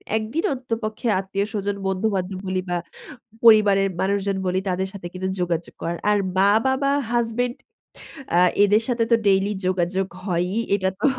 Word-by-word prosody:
১ 220 Hz, -, 0 dB
দিন 330 Hz, -, 0 dB
অন্ততপক্ষে 230 Hz, -3 st, -4 dB
আত্মীয়স্বজন 200 Hz, +1 st, -2 dB
বন্ধুবান্ধব 190 Hz, -1 st, -1 dB
বলি 185 Hz, 0 st, 0 dB
বা 175 Hz, -, 0 dB, 0.7 s
পরিবারের 205 Hz, -3 st, +6 dB
মানুষজন 200 Hz, 0 st, 0 dB
বলি 185 Hz, +1 st, +1 dB
তাদের 185 Hz, +1 st, -1 dB
সাথে 185 Hz, -3 st, -7 dB
কিন্তু 185 Hz, +1 st, -3 dB
যোগাযোগ 170 Hz, -1 st, -2 dB
করার। 170 Hz, 0 st, -2 dB
আর 210 Hz, -, +4 dB, 0.2 s
মা-বাবা, 230 Hz, +8 st, +3 dB, 0.2 s
হাসব্যান্ড 240 Hz, +1 st, 0 dB, 0.8 s
আ 175 Hz, -, +5 dB, 0.3 s
এদের 210 Hz, +2 st, +3 dB
সাথে 235 Hz, -2 st, +1 dB
তো 230 Hz, -, +6 dB
ডেইলি 195 Hz, +1 st, +3 dB, 0.2 s
যোগাযোগ 185 Hz, +1 st, 0 dB, 0.2 s
হয়ই। 180 Hz, +2 st, -1 dB, 0.2 s
এটা 190 Hz, -2 st, +1 dB
তো -, -, -4 dB
200 Hz, 145 wpm, -23 LUFS, 185-220 Hz, 0.8 s, পরিবারের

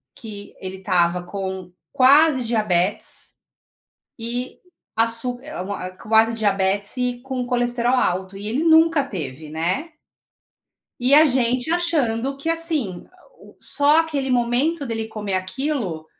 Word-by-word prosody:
que 205 Hz, -3 st, -10 dB
ele 190 Hz, 0 st, -7 dB
estava 180 Hz, -1 st, +1 dB
com 190 Hz, -1 st, -6 dB, 0.2 s
quase 275 Hz, +1 st, +5 dB
diabetes 210 Hz, -5 st, 0 dB, 0.8 s
e 245 Hz, +2 st, -4 dB, 0.4 s
açú 230 Hz, +2 st, +2 dB
eh, 305 Hz, -5 st, -8 dB
u -, -, -5 dB
uma 190 Hz, -2 st, -5 dB
quase 225 Hz, +1 st, +3 dB
diabetes 200 Hz, 0 st, 0 dB
e 245 Hz, -1 st, -1 dB
com 260 Hz, -1 st, -4 dB
colesterol 245 Hz, 0 st, +1 dB
alto, 190 Hz, -1 st, -1 dB
e 205 Hz, +1 st, -6 dB
ele 265 Hz, +9 st, -1 dB
nunca 320 Hz, -2 st, +4 dB
teve, 155 Hz, -, -7 dB
né. 175 Hz, -, -2 dB, 1.1 s
E 255 Hz, +3 st, +2 dB
a 305 Hz, +2 st, +8 dB
gente 255 Hz, +1 st, +1 dB
achando 275 Hz, -7 st, 0 dB
que 280 Hz, +4 st, -4 dB
assim 315 Hz, -, -1 dB
a 370 Hz, -, -25 dB, 0.2 s
o -, -, -17 dB
só 295 Hz, +2 st, +3 dB
aquele 285 Hz, -5 st, -3 dB
momento 255 Hz, +6 st, +1 dB
dele 225 Hz, -2 st, -3 dB
comer 210 Hz, -3 st, -4 dB
aquilo 185 Hz, -, -3 dB
235 Hz, 135 wpm, -21 LUFS, 195-275 Hz, 1.1 s, a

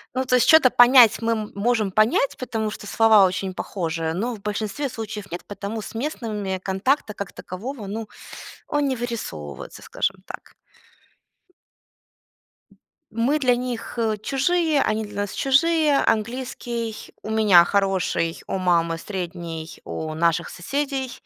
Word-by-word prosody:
Ну, 260 Hz, +1 st, 0 dB
то 250 Hz, 0 st, +2 dB
есть 250 Hz, -, +3 dB
чё-то 315 Hz, -5 st, +7 dB
понять 245 Hz, -2 st, +7 dB
мы 230 Hz, 0 st, +1 dB, 0.2 s
можем 215 Hz, -1 st, +1 dB
понять, 215 Hz, +6 st, +2 dB
потому 225 Hz, -4 st, -3 dB
что 210 Hz, -, -8 dB
слова 220 Hz, -1 st, +5 dB
очень 185 Hz, 0 st, -2 dB
похожие, 165 Hz, -4 st, -3 dB
но 230 Hz, +8 st, -2 dB
в 200 Hz, -, -14 dB
большинстве 215 Hz, +7 st, -3 dB
случаев 215 Hz, -4 st, -7 dB
нет. 175 Hz, -, -6 dB
Потому 205 Hz, +2 st, -5 dB
с 225 Hz, -, -9 dB
местными 215 Hz, -8 st, -3 dB
контакта 210 Hz, +5 st, 0 dB
как 200 Hz, -2 st, -6 dB
такового, 215 Hz, +3 st, -7 dB
ну 215 Hz, +1 st, -5 dB, 0.6 s
он 290 Hz, -1 st, 0 dB
не 260 Hz, -, 0 dB
вырисовывается, 210 Hz, -, -6 dB
скажем 195 Hz, 0 st, -2 dB
так. -, -, -11 dB, 2.6 s
Мы 245 Hz, +7 st, +1 dB
для 250 Hz, -3 st, +3 dB
них, 245 Hz, -1 st, -5 dB
э, 220 Hz, -2 st, +1 dB
чужие, 310 Hz, +1 st, +1 dB
они 215 Hz, +1 st, 0 dB
для 205 Hz, -1 st, -9 dB
нас 205 Hz, -, -6 dB
чужие. 300 Hz, +2 st, +3 dB
Английский 235 Hz, 0 st, -2 dB, 0.3 s
у -, -, -6 dB
меня 210 Hz, -6 st, +6 dB
хороший, 190 Hz, -4 st, 0 dB
у -, -, -2 dB
мамы 170 Hz, -3 st, +1 dB
средний, 170 Hz, -3 st, -6 dB
у 155 Hz, 0 st, -5 dB
наших 165 Hz, 0 st, +1 dB
соседей 270 Hz, +5 st, -3 dB
220 Hz, 140 wpm, -23 LUFS, 190-250 Hz, 2.6 s, чё-то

